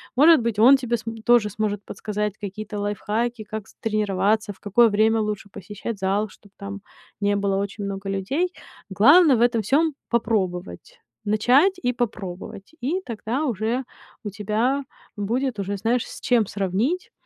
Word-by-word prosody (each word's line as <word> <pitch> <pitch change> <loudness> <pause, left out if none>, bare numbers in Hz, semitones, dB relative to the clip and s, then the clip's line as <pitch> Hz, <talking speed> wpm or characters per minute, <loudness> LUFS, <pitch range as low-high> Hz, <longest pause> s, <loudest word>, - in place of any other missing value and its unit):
Может 305 +2 +7
быть, 230 -2 -2
он 260 +5 +8
тебе, 240 -2 -1
см 225 0 -7
тоже 235 -3 +4
сможет 205 0 -2
подсказать 210 -1 -3
какие-то 210 +1 -6
лайфхаки, 215 +3 -2
как, 215 0 -7
з - - -20
тренироваться, 210 0 0
в 190 - -26
какое 230 +3 +4
время 220 +2 +3
лучше 210 -1 -4
посещать 205 +3 -7
зал, 200 +3 0
чтоб 200 +1 -19
там 200 0 -7 0.4
не 205 0 +1
было 200 -1 0
очень 200 +1 -3
много 195 0 -5
людей. 270 - -1 0.4
Главное 280 - +6
в 230 - 0
этом 235 -2 +3
всём- 300 +8 +2 0.2
попробовать, 215 - -2 0.2
начать 245 - +4
и 245 -1 0
попробовать, 195 -5 -5
и 315 +10 0
тогда 235 +5 -3
уже 235 +1 -1 0.4
у 205 - -5
тебя 220 +7 0 0.3
будет 235 +3 -1
уже, 200 +1 -2
знаешь, 230 +4 0
с - - -9
чем 235 -5 +2
сравнить. 205 - -1
215 Hz, 155 wpm, -23 LUFS, 200-240 Hz, 0.4 s, он